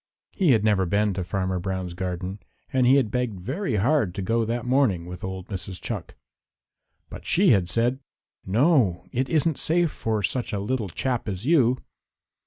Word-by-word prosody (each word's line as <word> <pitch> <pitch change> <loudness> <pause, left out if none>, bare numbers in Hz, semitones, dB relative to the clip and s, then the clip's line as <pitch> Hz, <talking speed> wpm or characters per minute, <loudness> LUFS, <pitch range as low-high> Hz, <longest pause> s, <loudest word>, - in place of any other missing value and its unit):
He 175 -9 +3
had 110 -3 +2
never 100 -4 +2
been 100 +2 +1
to 95 0 -3
Farmer 95 +1 -2
Brown's 95 -1 -3
garden 90 +2 -4 0.3
and 130 -2 +3
he 130 - +6
had 130 -7 +2
begged 125 -6 -2
very 130 - -2
hard 110 - +2
to 100 - -3
go 115 +4 +1
that 120 +2 -2
morning 125 -10 +2
with 90 0 -8
old 95 0 -5
Mrs. 95 -2 -6
Chuck. - - -5 1.0
But - - -8
she 190 +2 +4
had 95 - +3
said 120 +5 +1 0.4
"No. 105 - +2
It 130 +2 -1
isn't 160 -1 +1
safe 170 0 +2
for 110 -2 -2
such 120 +5 -1
a 100 - -1
little 110 0 -2
chap 120 - -2
as 95 +3 -5
you." 130 -6 +4
110 Hz, 180 wpm, -25 LUFS, 95-130 Hz, 1.0 s, he